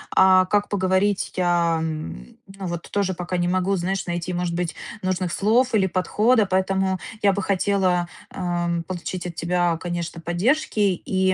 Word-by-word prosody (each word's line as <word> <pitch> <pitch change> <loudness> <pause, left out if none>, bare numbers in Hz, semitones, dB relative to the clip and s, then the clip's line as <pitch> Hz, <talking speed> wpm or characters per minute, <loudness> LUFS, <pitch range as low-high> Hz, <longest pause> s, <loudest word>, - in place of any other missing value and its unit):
А 185 0 +6
как 205 +1 +1
поговорить, 190 0 +1
я, 175 -2 +2
м, 155 - -5
ну 195 0 -8
вот 175 -1 -5
тоже 200 -2 0
пока 180 0 -3
не 175 - +1
могу, 185 +2 +1
знаешь, 190 +2 -2
найти, 175 +1 -3
может 175 -1 -2
быть, 175 -2 -2 0.3
нужных 185 -1 -1
слов 230 +6 +2
или 200 -3 +4
подхода. 210 +5 +2
Поэтому 190 0 +1 0.2
я 200 -1 +4
бы 200 -1 -2
хотела, 185 -2 +1 0.2
эм, 175 -2 -1
получить 180 +1 -5
от 170 - -7
тебя, 175 0 +1
конечно, 170 -1 -4
поддержки. 215 - 0 0.3
И, 190 0 +2
185 Hz, 160 wpm, -23 LUFS, 175-195 Hz, 0.3 s, А